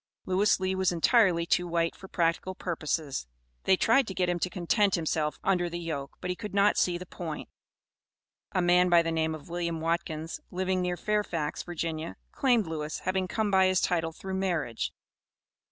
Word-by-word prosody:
Lewis 190 Hz, +3 st, +3 dB
Lee 190 Hz, 0 st, 0 dB
was 190 Hz, -1 st, +1 dB
entirely 175 Hz, -1 st, +4 dB
too 175 Hz, +1 st, +1 dB
white 165 Hz, -1 st, 0 dB
for 190 Hz, -, -11 dB
practical 170 Hz, +1 st, 0 dB
purposes. 155 Hz, -, -2 dB, 0.4 s
They 190 Hz, -, +5 dB
tried 235 Hz, +5 st, +4 dB
to 190 Hz, -, -5 dB
get 180 Hz, -1 st, +1 dB
him 175 Hz, 0 st, 0 dB
to 185 Hz, -, 0 dB
content 190 Hz, +3 st, +2 dB
himself 155 Hz, -2 st, -1 dB
under 180 Hz, -2 st, +2 dB
the 170 Hz, -, -4 dB
yoke, 155 Hz, -5 st, -5 dB
but 180 Hz, -, -2 dB
he -, -, -2 dB
could 210 Hz, 0 st, -7 dB
not 200 Hz, +1 st, +4 dB
see 175 Hz, -1 st, +2 dB
the 180 Hz, -, -8 dB
point. 165 Hz, -4 st, -6 dB, 1.0 s
A 185 Hz, -, +1 dB
man 180 Hz, +1 st, +4 dB
by 170 Hz, -1 st, +6 dB
the 165 Hz, -, -1 dB
name 160 Hz, -1 st, 0 dB
of 150 Hz, -2 st, -12 dB
William 170 Hz, -1 st, -2 dB
Watkins, 165 Hz, -1 st, -2 dB
living 185 Hz, 0 st, -1 dB
near 180 Hz, 0 st, -1 dB
Fairfax, 190 Hz, -8 st, -1 dB
Virginia, 165 Hz, -1 st, -4 dB, 0.2 s
claimed 245 Hz, -6 st, +2 dB
Lewis, 155 Hz, -2 st, -4 dB
having 185 Hz, 0 st, 0 dB
come 215 Hz, +2 st, -1 dB
by 190 Hz, -1 st, +5 dB
his 185 Hz, -1 st, +3 dB
title 165 Hz, -2 st, 0 dB
through 190 Hz, +4 st, -7 dB
marriage. 170 Hz, -11 st, -1 dB
175 Hz, 185 wpm, -29 LUFS, 165-190 Hz, 1.0 s, by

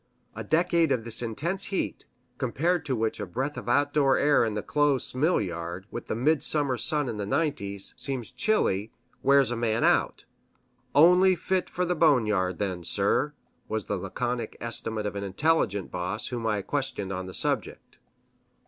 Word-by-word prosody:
A -, -, -5 dB
decade 165 Hz, -1 st, +2 dB
of 125 Hz, -4 st, +1 dB
this 115 Hz, 0 st, +1 dB
intense 150 Hz, -, -1 dB
heat, 195 Hz, -, -3 dB, 0.3 s
compared 165 Hz, +1 st, 0 dB
to 130 Hz, -, 0 dB
which 110 Hz, -1 st, -1 dB
a 105 Hz, -, -3 dB
breath 130 Hz, +11 st, -3 dB
of -, -, -6 dB
outdoor 145 Hz, +1 st, +3 dB
air 145 Hz, -3 st, +4 dB
in 110 Hz, -2 st, -1 dB
the 105 Hz, -, -3 dB
close 145 Hz, -3 st, +1 dB
mill 155 Hz, +8 st, +2 dB
yard, 85 Hz, -1 st, -5 dB
with -, -, -6 dB
the -, -, -2 dB
midsummer 145 Hz, +1 st, +2 dB
sun 150 Hz, +2 st, 0 dB
in 115 Hz, -3 st, -4 dB
the 100 Hz, -, -3 dB
nineties, 100 Hz, -8 st, -2 dB
seems 125 Hz, -2 st, -3 dB
chilly, 110 Hz, -, +1 dB, 0.3 s
wears 140 Hz, -2 st, +4 dB
a -, -, -1 dB
man 115 Hz, -1 st, 0 dB
out -, -, +2 dB, 0.7 s
"only 180 Hz, +4 st, +6 dB
fit 185 Hz, +2 st, -1 dB
for 180 Hz, -, -1 dB
the 180 Hz, -, 0 dB
boneyard 105 Hz, -, +2 dB
then, 95 Hz, -4 st, -3 dB
sir," 100 Hz, -, +1 dB, 0.4 s
was 110 Hz, -2 st, -2 dB
the 105 Hz, -, -2 dB
laconic 120 Hz, +5 st, -3 dB
estimate 115 Hz, -2 st, -4 dB
of 105 Hz, -, -3 dB
an 100 Hz, -, -3 dB
intelligent 100 Hz, -, 0 dB
boss 90 Hz, +4 st, -3 dB
whom 120 Hz, -3 st, -3 dB
I 105 Hz, -2 st, 0 dB
questioned 95 Hz, 0 st, -3 dB
on 95 Hz, 0 st, -5 dB
the 95 Hz, -, -8 dB
subject. -, -, -2 dB
120 Hz, 170 wpm, -27 LUFS, 105-150 Hz, 0.7 s, only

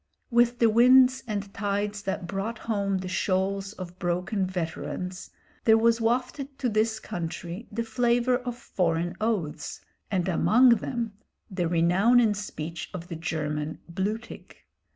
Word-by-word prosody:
With 240 Hz, 0 st, +4 dB
the 235 Hz, -, +5 dB
winds 255 Hz, +3 st, +6 dB
and 200 Hz, -2 st, -4 dB
tides 205 Hz, 0 st, -2 dB
that 190 Hz, -2 st, -3 dB
brought 200 Hz, +6 st, -3 dB
home 200 Hz, -3 st, -1 dB
the 185 Hz, 0 st, -5 dB
shoals 195 Hz, +2 st, -1 dB
of 180 Hz, -3 st, -9 dB
broken 185 Hz, +3 st, -1 dB
veterans, 180 Hz, +1 st, -4 dB, 0.4 s
there 220 Hz, -1 st, +7 dB
was 230 Hz, +1 st, +3 dB
wafted 255 Hz, +4 st, -1 dB
to 255 Hz, -3 st, 0 dB
this 220 Hz, +1 st, +1 dB
country 175 Hz, +2 st, -5 dB
the 230 Hz, +2 st, -2 dB
flavour 240 Hz, +2 st, +2 dB
of 245 Hz, -1 st, -5 dB
foreign 175 Hz, -6 st, -1 dB
oaths, 180 Hz, -9 st, -2 dB, 0.3 s
and 185 Hz, -3 st, 0 dB
among 230 Hz, +8 st, +5 dB
them 235 Hz, -4 st, -3 dB, 0.4 s
the 180 Hz, -3 st, -1 dB
renown 180 Hz, +8 st, +4 dB
in 225 Hz, -3 st, +4 dB
speech 170 Hz, -5 st, -6 dB
of 175 Hz, -1 st, -7 dB
the 170 Hz, -, -4 dB
German 155 Hz, -2 st, -3 dB
"blutig." 205 Hz, +6 st, -4 dB
200 Hz, 140 wpm, -27 LUFS, 180-230 Hz, 0.4 s, there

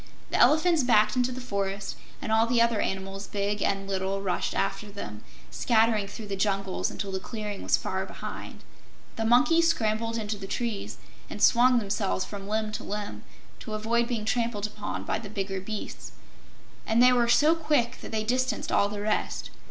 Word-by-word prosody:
The -, -, +1 dB
elephants 315 Hz, +5 st, +5 dB
backed 215 Hz, -4 st, +4 dB
into 250 Hz, 0 st, +1 dB
the 255 Hz, -, -5 dB
forest, 200 Hz, -4 st, -3 dB, 0.3 s
and 225 Hz, -, -3 dB
all 220 Hz, +1 st, +4 dB
the 240 Hz, 0 st, +2 dB
other 230 Hz, -2 st, +3 dB
animals, 195 Hz, +1 st, -3 dB
big 205 Hz, 0 st, -2 dB
and 195 Hz, 0 st, 0 dB
little, 195 Hz, 0 st, -1 dB
rushed 195 Hz, -2 st, -1 dB
after 210 Hz, -, -1 dB
them, 105 Hz, -, -8 dB, 0.3 s
scattering 220 Hz, -3 st, +2 dB
through 210 Hz, +2 st, -8 dB
the 200 Hz, -1 st, -3 dB
jungles 195 Hz, -1 st, 0 dB
until 200 Hz, -2 st, -5 dB
the 190 Hz, -, -2 dB
clearing 210 Hz, -1 st, -5 dB
was -, -, +3 dB
far -, -, -2 dB
behind. -, -, -8 dB, 0.5 s
The 225 Hz, -, -2 dB
monkeys 305 Hz, +9 st, +5 dB
scrambled 225 Hz, -5 st, 0 dB
into 210 Hz, -1 st, -3 dB
the 195 Hz, -, -7 dB
trees 230 Hz, 0 st, -3 dB, 0.3 s
and -, -, -7 dB
swung 250 Hz, +1 st, +5 dB
themselves 195 Hz, -, -1 dB
from 200 Hz, -1 st, -8 dB
limb 215 Hz, 0 st, -1 dB
to 210 Hz, -, -5 dB
limb, 205 Hz, 0 st, -5 dB, 0.4 s
to 215 Hz, -3 st, -5 dB
avoid 230 Hz, +2 st, +1 dB
being 230 Hz, -4 st, -2 dB
trampled 230 Hz, -2 st, 0 dB
upon 210 Hz, 0 st, -5 dB
by -, -, -1 dB
the 210 Hz, -3 st, -8 dB
bigger 195 Hz, -2 st, -3 dB
beasts, 215 Hz, +2 st, -6 dB, 0.7 s
and 220 Hz, +1 st, +2 dB
they 250 Hz, 0 st, +7 dB
were 240 Hz, -1 st, +3 dB
so 300 Hz, +6 st, +5 dB
quick 300 Hz, -7 st, 0 dB
that -, -, -8 dB
they 220 Hz, -1 st, -1 dB
distanced 255 Hz, +3 st, 0 dB
all 200 Hz, -, +3 dB
the 205 Hz, 0 st, -5 dB
rest. 215 Hz, +1 st, -1 dB
215 Hz, 185 wpm, -27 LUFS, 200-235 Hz, 0.7 s, they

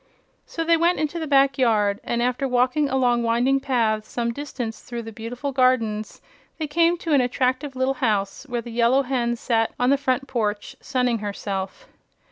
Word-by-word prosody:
So 330 Hz, -, -3 dB
they 335 Hz, 0 st, +4 dB
went 340 Hz, +2 st, +2 dB
into 310 Hz, +2 st, -2 dB
the 320 Hz, -, -4 dB
back 275 Hz, -2 st, +3 dB
yard, 210 Hz, -5 st, +2 dB
and 235 Hz, 0 st, -1 dB
after 250 Hz, +2 st, 0 dB
walking 255 Hz, +3 st, +1 dB
along 250 Hz, -2 st, +2 dB
winding 240 Hz, +4 st, +2 dB
paths 225 Hz, -5 st, 0 dB
some 235 Hz, -1 st, -2 dB
distance 250 Hz, -5 st, -5 dB
through 235 Hz, -1 st, -6 dB
the 225 Hz, -, -8 dB
beautiful 240 Hz, +6 st, -5 dB
gardens 240 Hz, -5 st, 0 dB, 0.3 s
they 315 Hz, -, -2 dB
came 335 Hz, +3 st, +2 dB
to 330 Hz, -2 st, -2 dB
an 280 Hz, -, +5 dB
attractive 255 Hz, +2 st, -1 dB
little 260 Hz, +1 st, +1 dB
house 215 Hz, -1 st, -1 dB
where 240 Hz, -1 st, -2 dB
the 240 Hz, -, -8 dB
Yellow 240 Hz, +4 st, +3 dB
Hen 245 Hz, -2 st, -1 dB
sat 225 Hz, -1 st, 0 dB
on 250 Hz, +2 st, +3 dB
the 280 Hz, -, +3 dB
front 270 Hz, 0 st, 0 dB
porch 210 Hz, -5 st, -2 dB
sunning 250 Hz, -3 st, 0 dB
herself. 200 Hz, -, -5 dB
250 Hz, 180 wpm, -23 LUFS, 230-275 Hz, 0.3 s, an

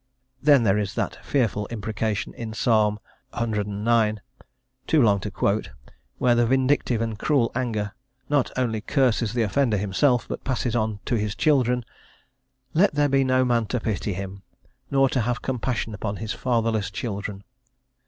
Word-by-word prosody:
Then 140 Hz, -4 st, +5 dB
there 105 Hz, -1 st, +3 dB
is 100 Hz, -2 st, -3 dB
that -, -, -3 dB
fearful 110 Hz, -6 st, 0 dB
imprecation 110 Hz, -1 st, -3 dB
in 115 Hz, -2 st, -6 dB
Psalm 110 Hz, -3 st, +2 dB, 0.4 s
cix., 110 Hz, -3 st, -1 dB, 1.2 s
too 160 Hz, -, +3 dB
long 105 Hz, -6 st, +4 dB
to 105 Hz, -, -4 dB
quote, 100 Hz, +2 st, 0 dB, 0.5 s
where 125 Hz, -, +3 dB
the 120 Hz, 0 st, +3 dB
vindictive 130 Hz, -2 st, +2 dB
and 110 Hz, -2 st, -4 dB
cruel 135 Hz, -6 st, +2 dB
anger 110 Hz, -5 st, -2 dB, 0.3 s
not 145 Hz, -3 st, +2 dB
only 115 Hz, -4 st, 0 dB
curses 120 Hz, -3 st, +1 dB
the 120 Hz, -, +2 dB
offender 115 Hz, +1 st, +1 dB
himself, 105 Hz, +6 st, +1 dB
but -, -, -5 dB
passes 125 Hz, -2 st, -1 dB
on 110 Hz, -3 st, -1 dB
to 120 Hz, -, 0 dB
his 105 Hz, 0 st, -2 dB
children: 125 Hz, -5 st, +2 dB, 0.9 s
"Let 180 Hz, 0 st, +3 dB
there 145 Hz, 0 st, +3 dB
be 135 Hz, 0 st, +3 dB
no 130 Hz, 0 st, +3 dB
man 120 Hz, -3 st, +1 dB
to 125 Hz, -, -1 dB
pity 105 Hz, -2 st, -2 dB
him, 95 Hz, +1 st, -6 dB, 0.5 s
nor 135 Hz, -1 st, +4 dB
to 130 Hz, -, 0 dB
have 120 Hz, +3 st, -2 dB
compassion 125 Hz, -3 st, -2 dB
upon 100 Hz, 0 st, -3 dB
his 110 Hz, +1 st, -4 dB
fatherless 115 Hz, -5 st, 0 dB
children." 100 Hz, -2 st, -5 dB
115 Hz, 155 wpm, -24 LUFS, 105-130 Hz, 1.2 s, Then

